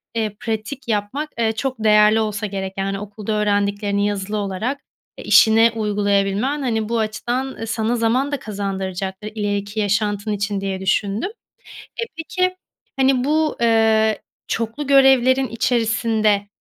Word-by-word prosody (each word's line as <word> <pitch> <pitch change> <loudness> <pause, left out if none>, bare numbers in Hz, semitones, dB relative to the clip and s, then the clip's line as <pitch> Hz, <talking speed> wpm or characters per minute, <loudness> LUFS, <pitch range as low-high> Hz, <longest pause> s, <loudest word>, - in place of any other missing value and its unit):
eee, 215 -2 -1
pratik 235 +3 -4
yapmak, 225 +8 -2
eee, 225 -1 +2
çok 255 +3 -3
değerli 210 0 +5
olsa 215 -1 -2
gerek, 195 -1 -4
yani, 195 0 -2
okulda 210 +1 -6
öğrendiklerini 205 -1 0
yazılı 205 +1 -3
olarak, 205 +7 -2 0.4
eee, - - -9
işine 225 +1 +6
uygulayabilmen, 205 +5 0
hani, 225 -4 -1
bu 235 0 0
açıdan 240 +3 -3
sana 225 +1 0
zaman 245 +5 +1
da 285 - -2
kazandıracaktır, 195 -1 -4
ileriki 205 0 -2
yaşantın 205 0 0
için 205 -1 -2
diye 195 -1 -3
düşündüm. 200 - 0 0.7
Eee, 465 - -2
peki, 365 +3 -1 0.4
hani, 265 0 +5
eee, 250 -1 0
bu 310 +2 +1 0.9
çoklu 230 +6 -3
görevlerin 265 -1 +5
içerisinde, 225 -3 +1
215 Hz, 130 wpm, -20 LUFS, 205-245 Hz, 0.9 s, işine